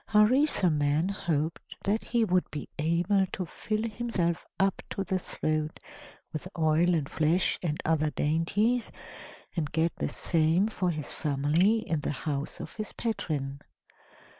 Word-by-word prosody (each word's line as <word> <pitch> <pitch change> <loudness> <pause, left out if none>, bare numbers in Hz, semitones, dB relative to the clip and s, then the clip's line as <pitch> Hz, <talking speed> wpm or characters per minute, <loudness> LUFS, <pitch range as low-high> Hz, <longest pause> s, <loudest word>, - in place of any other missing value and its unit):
Harisarman 190 - +3
hoped 165 -5 -2
that 210 +3 +1
he 235 -1 +2
would 180 -2 +1
be 150 - -5
able 175 +5 +2
to 185 0 -4
fill 215 +6 -3
himself 210 -7 -1 0.2
up 195 0 +2
to 195 - -2
the 190 0 -1
throat 155 -3 -2 0.5
with 155 +3 -4
oil 165 +2 +3
and 150 -4 0
flesh 160 +5 +2
and 160 -3 -1
other 155 -1 +2
dainties, 195 +12 +1 0.6
and 155 -5 -1
get 160 +2 +1
the - - -1
same 165 +3 +2
for 190 -5 -1
his 155 -4 -4
family, 160 +10 +2
in 160 - 0
the - - -3
house 145 0 -3
of - - -7
his 215 -2 -4
patron. 145 - -3
170 Hz, 140 wpm, -29 LUFS, 155-200 Hz, 0.6 s, Harisarman